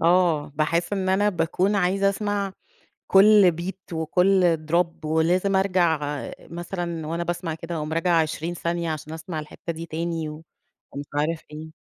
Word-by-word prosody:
آه، 170 -3 +3
باحس 165 +5 0
إن 190 -2 -1
أنا 205 +2 +3
باكون 180 +2 0
عايزة 195 +1 +2
أسمَع 200 -1 -1 0.5
كلّ 195 -1 +7
beat 190 +1 -7
وكّل 180 +2 +3
drop 170 -1 +1
ولازم 175 +5 +2
أرجَع 170 -6 +1 0.2
مثلًا 170 -1 -5
وأنا 165 +2 -2
باسمَع 170 -1 -3
كده 165 +1 -6
أقوم 155 0 -4
راجعة 165 0 +3
20 160 +2 -3
ثانية، 170 0 -2
عشان 155 0 -5
أسمَع 160 +1 -5
الحِتّة 170 +3 -7
دي 165 +1 -7
تاني 165 0 -3
و 150 +1 -8 0.5
ومش 145 +1 -6
عارف 155 +2 0
إيه. 155 +1 -9
170 Hz, 150 wpm, -24 LUFS, 160-185 Hz, 0.5 s, كلّ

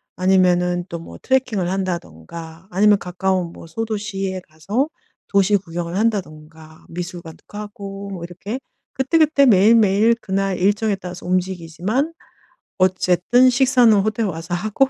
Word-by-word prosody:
아니면은 180 -1 +2
또 170 - -4
뭐 165 - -11
트레킹을 250 -9 0
한다든가 170 - -5
아니면 205 +2 +4
가까운 180 -1 -2
뭐 165 - -12
소도시에 200 -2 -3
가서 205 - -2 0.4
도시 200 +1 +3
구경을 170 -1 -5
한다든가 160 -7 -3
미술관도 175 -1 -7
가고 200 -1 -8
뭐 185 -3 -6
이렇게 195 +8 -6 0.3
그때그때 290 +1 +3
매일매일 215 +1 +5
그날 195 -2 -1
일정에 205 +2 +1
따라서 180 -2 -9
움직이지만 185 - -1 0.6
어쨌든 185 +6 +3
식사는 250 -2 +4
호텔 215 +2 0
와서 165 -1 -4
하고 215 +9 +1
190 Hz, 320 characters per minute, -20 LUFS, 175-215 Hz, 0.6 s, 매일매일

